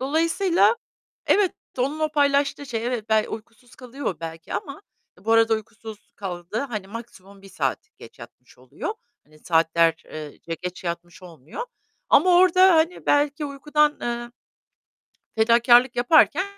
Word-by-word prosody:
Dolayısıyla 335 Hz, -, +2 dB, 0.5 s
evet, 400 Hz, -3 st, +3 dB, 0.3 s
onun 275 Hz, +5 st, -1 dB
o 310 Hz, -1 st, 0 dB
paylaştığı 285 Hz, -1 st, +1 dB
şey, 230 Hz, -2 st, -4 dB
evet, 235 Hz, -3 st, -3 dB
bey 215 Hz, -1 st, +3 dB
uykusuz 230 Hz, +2 st, -11 dB
kalıyor 250 Hz, -, -5 dB
belki 165 Hz, -1 st, -8 dB
ama 275 Hz, -, -5 dB, 0.4 s
ı 190 Hz, -, -24 dB
bu 225 Hz, -, +1 dB
arada 225 Hz, 0 st, +4 dB
uykusuz 220 Hz, -1 st, -8 dB
kaldığı 180 Hz, +2 st, -5 dB
hani 215 Hz, -8 st, -5 dB
maksimum 200 Hz, -3 st, -11 dB
1 195 Hz, -, -14 dB
saat 185 Hz, -, -2 dB, 0.2 s
geç -, -, -15 dB
yatmış -, -, -15 dB
oluyor. 430 Hz, -, -6 dB, 0.3 s
Hani, 155 Hz, 0 st, -22 dB
saatler 165 Hz, 0 st, +2 dB
ııı, 155 Hz, -2 st, -9 dB
ce 165 Hz, 0 st, -6 dB
geç 180 Hz, +1 st, -6 dB
yatmış 170 Hz, +1 st, -6 dB
olmuyor 165 Hz, -, -10 dB, 0.5 s
ama 370 Hz, -, +5 dB
orada, 370 Hz, 0 st, +6 dB
hani 325 Hz, +3 st, 0 dB
belki 290 Hz, +1 st, +1 dB
uykudan, 295 Hz, +1 st, 0 dB
eee 240 Hz, 0 st, -4 dB, 1.0 s
fedakârlık 240 Hz, +2 st, +4 dB
yaparken 305 Hz, +7 st, +4 dB
235 Hz, 140 wpm, -23 LUFS, 195-290 Hz, 1.0 s, orada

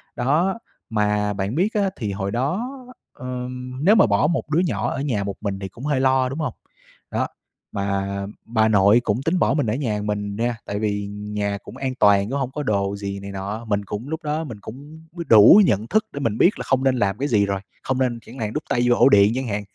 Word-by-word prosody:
Đó, 165 Hz, -, +1 dB, 0.3 s
mà 105 Hz, -1 st, +1 dB
bạn 100 Hz, +5 st, -3 dB
biết 195 Hz, +7 st, +1 dB
á, 200 Hz, -2 st, +1 dB
thì 105 Hz, -5 st, -3 dB
hồi 100 Hz, 0 st, -3 dB
đó, 160 Hz, -, -1 dB, 0.4 s
ờm, 125 Hz, +1 st, -6 dB
nếu 210 Hz, +3 st, +6 dB
mà -, -, +6 dB
bỏ 105 Hz, +7 st, +2 dB
một 165 Hz, -2 st, -2 dB
đứa 160 Hz, -, +3 dB
nhỏ 140 Hz, -, 0 dB
ở -, -, -3 dB
nhà 115 Hz, -9 st, -1 dB
một 100 Hz, 0 st, -4 dB
mình 100 Hz, -2 st, -3 dB
thì 95 Hz, -, -5 dB
cũng 120 Hz, +8 st, -10 dB
hơi 145 Hz, -3 st, +1 dB
lo, 130 Hz, -1 st, +2 dB
đúng 140 Hz, -, -5 dB
hông? 145 Hz, -7 st, -2 dB, 0.6 s
Đó, -, -, 0 dB, 0.4 s
mà 100 Hz, 0 st, -2 dB, 0.2 s
bà 110 Hz, -1 st, +2 dB
nội 105 Hz, +2 st, +5 dB
cũng 110 Hz, +4 st, 0 dB
tính 170 Hz, +4 st, +1 dB
bỏ 135 Hz, -, +3 dB
mình 145 Hz, -4 st, +1 dB
ở 105 Hz, -, +1 dB
nhà 110 Hz, -7 st, -2 dB
mình 105 Hz, -1 st, -3 dB
nha, 120 Hz, +1 st, -1 dB
tại 100 Hz, 0 st, -3 dB
vì 100 Hz, -2 st, -1 dB
nhà 105 Hz, 0 st, -3 dB
cũng -, -, -11 dB
an 130 Hz, -1 st, -3 dB
toàn 100 Hz, 0 st, +4 dB
cũng 140 Hz, -, -1 dB
hông 130 Hz, -1 st, -2 dB
có 150 Hz, +1 st, -4 dB
đồ 100 Hz, -3 st, 0 dB
gì 100 Hz, -1 st, -5 dB
này 100 Hz, 0 st, -8 dB
nọ. 100 Hz, +4 st, -5 dB
Mình 100 Hz, -2 st, -1 dB
cũng 105 Hz, +8 st, -6 dB
lúc 160 Hz, +1 st, -4 dB
đó 155 Hz, +2 st, -1 dB
mình 115 Hz, -8 st, -8 dB
cũng 145 Hz, +9 st, -11 dB
b 175 Hz, -, -13 dB
đủ 110 Hz, -, +9 dB
nhận 105 Hz, -, +1 dB
thức 215 Hz, +1 st, +2 dB
để 140 Hz, -, -5 dB
mình 115 Hz, -5 st, -1 dB
biết 205 Hz, +6 st, +3 dB
là -, -, -3 dB
không 130 Hz, 0 st, +1 dB
nên 130 Hz, -1 st, +3 dB
làm 100 Hz, -3 st, 0 dB
cái 140 Hz, +2 st, -1 dB
gì 105 Hz, -5 st, +3 dB
rồi, 100 Hz, -1 st, -2 dB, 0.2 s
không 130 Hz, 0 st, -1 dB
nên 120 Hz, -3 st, 0 dB
chẳng 125 Hz, +4 st, -11 dB
hạn 110 Hz, -1 st, -3 dB
đút 150 Hz, -, -3 dB
tay 120 Hz, -, +1 dB
vô 120 Hz, -, +5 dB
ổ -, -, +5 dB
điện 100 Hz, -1 st, +6 dB
chẳng 130 Hz, -1 st, -2 dB
hạn. 105 Hz, -1 st, -2 dB
115 Hz, 245 wpm, -22 LUFS, 100-135 Hz, 0.6 s, đủ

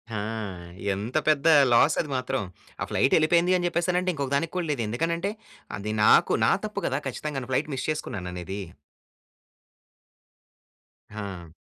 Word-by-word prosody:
ఆ! 105 Hz, -, -2 dB, 0.7 s
ఎంత 105 Hz, +8 st, -3 dB
పెద్ద 155 Hz, -1 st, +3 dB, 0.3 s
లాస్ 145 Hz, +6 st, +5 dB
అది 150 Hz, -, -7 dB
మాత్రం. 130 Hz, +1 st, -2 dB, 0.4 s
ఆ -, -, +1 dB
ఫ్లైట్ 135 Hz, -, +2 dB
వెళ్ళిపోయింది 170 Hz, +3 st, +4 dB
అని 175 Hz, -, -2 dB
చెప్పేసానంటే, 180 Hz, +2 st, 0 dB
ఇంకొకదానికి 140 Hz, +2 st, -1 dB
కూడా 180 Hz, -2 st, -1 dB
లేదు. 130 Hz, -5 st, -1 dB
ఎందుకనంటే, 170 Hz, -, -1 dB, 0.5 s
అది 105 Hz, +2 st, -4 dB
నాకు -, -, +5 dB
నా -, -, +4 dB
తప్పు -, -, -4 dB
కదా -, -, -1 dB
ఖచ్చితంగాను, 135 Hz, -4 st, -4 dB
ఫ్లైట్ 145 Hz, +4 st, 0 dB
మిస్ 130 Hz, -, -4 dB
చేసుకున్నాననేది. 95 Hz, -, -4 dB, 2.5 s
ఆ! 95 Hz, -6 st, -7 dB
140 Hz, 130 wpm, -26 LUFS, 105-165 Hz, 2.5 s, లాస్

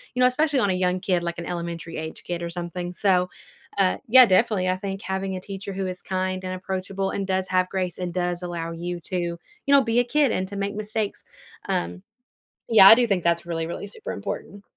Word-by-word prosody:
you -, -, -2 dB
know, 250 Hz, -, +7 dB
especially 285 Hz, +1 st, +1 dB
on 205 Hz, -, +2 dB
a -, -, +1 dB
young 180 Hz, 0 st, +1 dB
kid, 180 Hz, -2 st, 0 dB
like, 170 Hz, 0 st, -3 dB
an 170 Hz, -, -5 dB
elementary-age 165 Hz, -2 st, -5 dB
kid 175 Hz, -1 st, -4 dB
or 170 Hz, -, -3 dB
something, 175 Hz, +1 st, -5 dB
so, 180 Hz, -2 st, +2 dB, 0.5 s
uh, 190 Hz, -2 st, +3 dB
yeah, 255 Hz, +2 st, +9 dB
definitely, 190 Hz, -2 st, +2 dB
I 185 Hz, -, +1 dB
think 195 Hz, +1 st, -5 dB
having 190 Hz, 0 st, -3 dB
a 185 Hz, -, -5 dB
teacher 195 Hz, 0 st, -6 dB
who 190 Hz, 0 st, -2 dB
is 185 Hz, 0 st, -5 dB
kind 185 Hz, 0 st, -2 dB
and 185 Hz, -, -3 dB
approachable 190 Hz, +1 st, -3 dB
and 195 Hz, -1 st, -3 dB
does 190 Hz, 0 st, 0 dB
have 185 Hz, 0 st, +2 dB
grace 185 Hz, -2 st, -3 dB
and 180 Hz, -2 st, -4 dB
does 175 Hz, -1 st, -1 dB
allow 170 Hz, -2 st, -4 dB
you 175 Hz, +1 st, -5 dB
to, 185 Hz, +2 st, -4 dB
you 170 Hz, 0 st, -3 dB, 0.3 s
know, 280 Hz, -1 st, +7 dB
be 230 Hz, +1 st, +2 dB
a -, -, +4 dB
kid 285 Hz, 0 st, +2 dB
and 185 Hz, 0 st, -1 dB
to 200 Hz, -, -8 dB
make 200 Hz, +1 st, -2 dB
mistakes, 215 Hz, 0 st, -3 dB, 0.4 s
um, 90 Hz, +1 st, -2 dB, 0.7 s
yeah, 200 Hz, -4 st, +9 dB
I -, -, +12 dB
do 240 Hz, 0 st, +3 dB
think 195 Hz, -5 st, +1 dB
that's 170 Hz, 0 st, +2 dB
really, 165 Hz, -1 st, -3 dB
really 175 Hz, +4 st, -5 dB
super 210 Hz, -, -7 dB
important. 200 Hz, 0 st, -6 dB
185 Hz, 225 wpm, -24 LUFS, 175-200 Hz, 0.7 s, I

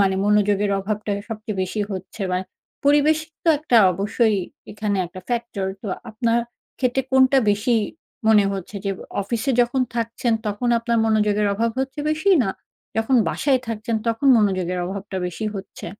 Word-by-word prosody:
মানে 195 Hz, -1 st, +3 dB
মনোযোগের 205 Hz, -1 st, +2 dB
অভাবটা 210 Hz, +2 st, -3 dB, 0.2 s
সবচেয়ে 215 Hz, -2 st, -5 dB
বেশি 210 Hz, +3 st, -3 dB
হচ্ছে? 190 Hz, +2 st, -6 dB
বা, 180 Hz, -, +1 dB, 0.5 s
পরিবেশ 295 Hz, +2 st, +4 dB, 0.3 s
তো -, -, +2 dB
একটা 295 Hz, -5 st, +2 dB, 0.2 s
অবশ্যই 210 Hz, +4 st, +1 dB, 0.4 s
এখানে 210 Hz, -1 st, -1 dB
একটা 185 Hz, +2 st, -10 dB
ফ্যাক্টর, 235 Hz, -5 st, -2 dB, 0.2 s
তো 215 Hz, -, -5 dB, 0.2 s
আপনার 230 Hz, +2 st, +1 dB, 0.4 s
ক্ষেত্রে 260 Hz, +1 st, +1 dB
কোনটা 265 Hz, +1 st, +5 dB
বেশি 205 Hz, +4 st, +1 dB, 0.5 s
মনে 210 Hz, -2 st, +6 dB
হচ্ছে? 195 Hz, +1 st, -6 dB
যে 200 Hz, -, 0 dB
এ -, -, -11 dB, 0.2 s
অফিসে 235 Hz, +6 st, -1 dB
যখন 245 Hz, +2 st, +1 dB, 0.2 s
থাকছেন, 230 Hz, +1 st, -1 dB
তখন 210 Hz, +4 st, -1 dB
আপনার 235 Hz, 0 st, 0 dB
মনোযোগের 210 Hz, -1 st, +2 dB
অভাব 230 Hz, +3 st, 0 dB
হচ্ছে 270 Hz, +2 st, -2 dB
বেশি? 315 Hz, +6 st, +1 dB
না 195 Hz, -, -1 dB, 0.5 s
যখন 225 Hz, +4 st, +2 dB
বাসায় 270 Hz, -3 st, +1 dB
থাকছেন, 225 Hz, 0 st, -2 dB
তখন 230 Hz, +5 st, 0 dB
মনোযোগের 185 Hz, -4 st, +1 dB
অভাবটা 195 Hz, +1 st, -5 dB
বেশি 180 Hz, +5 st, -5 dB
হচ্ছে? 195 Hz, -1 st, -8 dB
220 Hz, 155 wpm, -22 LUFS, 200-240 Hz, 0.5 s, মনে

